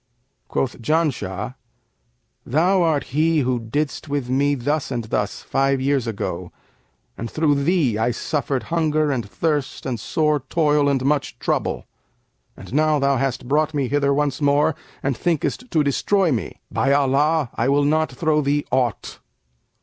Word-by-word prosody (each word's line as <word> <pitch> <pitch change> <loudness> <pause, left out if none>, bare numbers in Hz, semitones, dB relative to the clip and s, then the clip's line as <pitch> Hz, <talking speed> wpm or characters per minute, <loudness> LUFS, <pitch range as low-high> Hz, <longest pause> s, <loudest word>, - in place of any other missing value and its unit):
Quoth 130 -2 -2
Janshah, 120 - -1 0.9
'Thou 180 +8 +2
art 160 -4 +2
he 155 +1 +3
who 125 -1 0
didst 145 +6 -3
with 140 -3 -2
me 140 +2 +2
thus 145 +4 -1
and 120 -3 -2
thus 105 -1 -2
five 135 0 +1
years 135 -2 0
ago, 110 -3 -4 0.7
and 115 - -4
through 145 -1 +1
thee 145 - +2
I 115 - +2
suffered 135 +2 -2
hunger 155 -2 +2
and 120 -7 -3
thirst 150 +1 -2
and 120 -3 -2
sore 150 +5 +1
toil 145 +1 +2
and 135 -2 0
much 145 -1 0
trouble; - - -1 0.7
and - - -11
now 155 +1 +3
thou 140 -1 +2
hast 130 -1 -2
brought 150 +3 +1
me 135 -4 0
hither 140 0 +2
once 145 -1 0
more 145 +2 +3 0.3
and 135 -1 0
thinkest 175 - -1
to 160 -6 +2
destroy 175 +6 +2
me. 120 - -3
By 135 - +1
Allah, 145 +1 +2
I 120 +3 0
will 140 +1 +3
not 155 +1 +1
throw 150 +3 +1
thee 145 +1 0
aught!' 125 -5 -1
140 Hz, 155 wpm, -22 LUFS, 130-155 Hz, 0.9 s, he